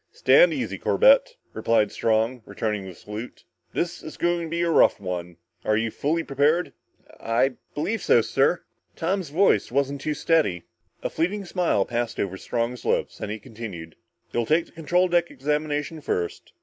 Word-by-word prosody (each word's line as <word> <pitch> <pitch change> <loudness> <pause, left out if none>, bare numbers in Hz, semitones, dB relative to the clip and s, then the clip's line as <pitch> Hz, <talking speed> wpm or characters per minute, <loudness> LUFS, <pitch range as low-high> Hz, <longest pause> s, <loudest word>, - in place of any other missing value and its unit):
"Stand - - +5
easy, - - -3
Corbett," - - +4 0.2
replied 110 -3 +2
Strong, 115 +2 +1
returning 105 -3 -3
the 90 - -9
salute. 105 +7 -8 0.3
"This 175 0 -2
is 155 - -9
going 175 0 +1
to 165 - -5
be 170 +1 -1
a 170 - +1
rough - - +5
one. 90 -3 -5 0.3
Are 110 - +2
you 115 0 -1
fully 160 +7 -1
prepared?" 150 +5 +1 0.5
"I 120 +4 +1 0.2
believe 205 +8 -1
so, 120 - +5
sir." 135 +9 +1 0.3
Tom's 180 0 -1
voice 175 -1 +3
wasn't 140 +1 0
too 150 0 -2
steady. 150 - +1 0.4
A - - -1
fleeting 195 +5 -1
smile 175 - +1
passed 120 -1 -3
over 95 -1 -1
Strong's 120 +4 -3
lips, - - -1
then - - -4
he 105 - -3
continued. 100 -7 -9 0.4
"You'll 120 -1 0
take 165 +2 +3
the - - -22
control 175 +3 +1
deck 175 -1 +2
examination 150 +2 -2
first. 85 -10 -3
140 Hz, 165 wpm, -25 LUFS, 110-170 Hz, 0.5 s, Stand